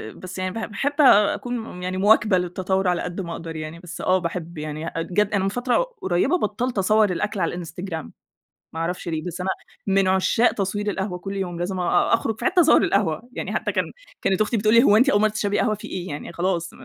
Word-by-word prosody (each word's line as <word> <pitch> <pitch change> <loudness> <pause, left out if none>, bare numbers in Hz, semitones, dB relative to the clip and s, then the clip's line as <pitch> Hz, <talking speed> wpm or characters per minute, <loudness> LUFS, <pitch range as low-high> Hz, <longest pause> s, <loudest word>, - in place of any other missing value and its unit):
بس 185 0 -9
يعني 185 0 -2
ب - - -10 0.2
باحب 280 +8 -1
أكون 225 -4 +3
يعني 185 0 -2
مواكبة 210 0 +4
للتطورعلى 180 0 0
قد 180 +2 -4
ما 170 -2 -6
أقدر 165 -1 -7
يعني. 155 +1 -6
بس 175 0 -8
آه 185 0 +3
باحب 170 -1 -5
يعني 155 +2 -5
جات 185 +5 0
أنا 195 -2 +2
من 195 - +1
فترة 245 - +1 0.2
قريبة 190 - +2
بطلت 240 - -2
أصور 210 +1 +3
الأكل 205 +3 -2
على 175 0 -2
الInstagram، 170 -2 -6 0.7
ما 160 - -5
أعرفش 175 +1 -3
ليه 160 -1 -2
بس 180 +1 -5
أنا 190 - -1 0.4
من 195 -1 +3
عشاق 190 +5 +3
تصوير 205 +1 -2
القهوة 190 -2 -3
كل 195 +2 -6
يوم 175 -3 -3
لازم 185 +1 -2
أ 175 +4 +2
أخرُج 225 -1 -1
في - - -6
حتة 365 -1 +3
أصور 320 - +5
القهوة. 195 +2 0
يعني - - -4
حتى - - -1
كان - - +1 0.4
كانت 190 +1 +1
أختي 215 +2 +1
بتقول 215 +2 +2
لي: 235 - +7
"هو 210 -6 +5
أنتِ 255 +5 +5
أول 205 - +4
مرة 215 - +4
تشربي 205 -1 -1
قهوة 215 -4 +2
في 210 - -9
إيه 185 0 -5
يعني 145 +3 -6
خلاص 170 -1 -1
190 Hz, 215 wpm, -23 LUFS, 175-210 Hz, 0.7 s, لي